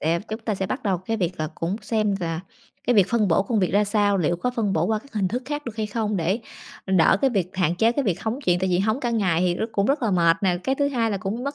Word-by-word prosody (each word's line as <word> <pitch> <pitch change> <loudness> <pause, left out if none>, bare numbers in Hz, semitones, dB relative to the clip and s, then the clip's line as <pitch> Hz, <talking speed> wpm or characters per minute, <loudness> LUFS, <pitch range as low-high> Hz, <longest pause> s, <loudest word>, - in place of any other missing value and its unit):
sẽ 165 +2 +1
chúng 220 +2 -4
ta 220 -1 -2
sẽ 190 0 -2
bắt 260 +7 -4
đầu 190 -4 0
cái 225 +5 -3
việc 180 -4 -2
là 155 - -1
cũng 170 +5 -2
xem 215 -2 0
là 165 -1 -2 0.5
cái 245 - +3
việc 200 -3 +5
phân 220 -4 +2
bổ 170 +3 +3
công 220 +2 -1
việc 185 - +1
ra 205 +1 +4
sao, 205 -1 +2
liệu 175 0 +1
có 250 +8 -1
phân 210 -4 0
bổ 160 -2 +1
qua 220 +1 +1
các 280 +5 -18
hình 200 -4 0
thức 245 +5 -3
khác 295 +2 -4
được 230 -3 -7
hay 215 -1 -1
không, 210 -1 -2
để 180 +5 0 0.5
đỡ 190 -4 +4
cái 270 - +3
việc 190 -6 -1
hạn 175 -3 +2
chế 225 +6 +3
cái 285 +2 -1
việc 190 -7 -1
hóng 225 +3 -2
chuyện, 180 0 +3
tại 190 +1 0
vì 175 - +2
hóng 220 +6 0
cả 240 - -1
ngày 190 -8 +1
thì 180 -1 +2
rất 220 - -2
cũng 200 0 +1
rất 280 0 +1
là 225 - +1
mệt 170 -3 +4
nè, 180 -2 +2
cái 265 - +1
thứ 280 +1 +1
hai 235 -5 0
là 200 - -1
cũng 205 +6 -4
mất 280 +1 -3
205 Hz, 310 wpm, -24 LUFS, 180-230 Hz, 0.5 s, việc